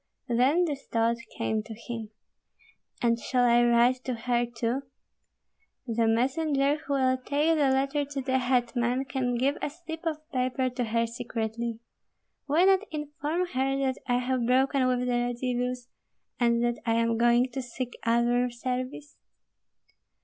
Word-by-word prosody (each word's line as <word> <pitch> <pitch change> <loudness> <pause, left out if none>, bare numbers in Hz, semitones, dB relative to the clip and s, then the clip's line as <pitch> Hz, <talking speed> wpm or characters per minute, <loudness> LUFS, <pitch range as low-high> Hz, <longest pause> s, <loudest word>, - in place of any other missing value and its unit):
Then 265 +9 +3
this 285 -4 -5
thought 230 0 +1 0.2
came 220 -1 0
to 220 +1 -9
him: 230 -1 -6 0.9
"And 235 0 +3
shall 250 +1 +1
I 240 0 +5
write 240 +2 +3
to 255 - -1
her 240 +1 0
too? 240 +2 -2 1.0
The 230 -2 +1
messenger 275 +4 +2
who 290 -1 -4
will 260 -1 +2
take 290 +5 +1
the 290 -3 +3
letter 275 +2 +1
to 280 -1 -4
the 260 0 +1
hetman 245 0 +1
can 260 -2 -1
give 270 +4 +1
a - - -1
slip 325 +1 -9
of 310 -1 -4
paper 255 -1 0
to 245 -1 -2
her 230 +1 +1
secretly. 230 0 -4 0.7
Why 310 +5 +3
not 390 +2 +4
inform 300 +3 -2
her 270 0 0
that 265 -1 -1
I 245 - +2
have 250 -1 0
broken 260 +1 +3
with 250 -1 +1
the - - -1
Radzivills, 245 0 -1 0.5
and 235 -1 +3
that 240 0 0
I 230 -1 +1
am 230 0 +2
going 240 +2 +4
to 265 - -3
seek 245 0 -5
other 240 +2 +2
service?" 255 +4 -5
250 Hz, 155 wpm, -28 LUFS, 235-275 Hz, 1.0 s, I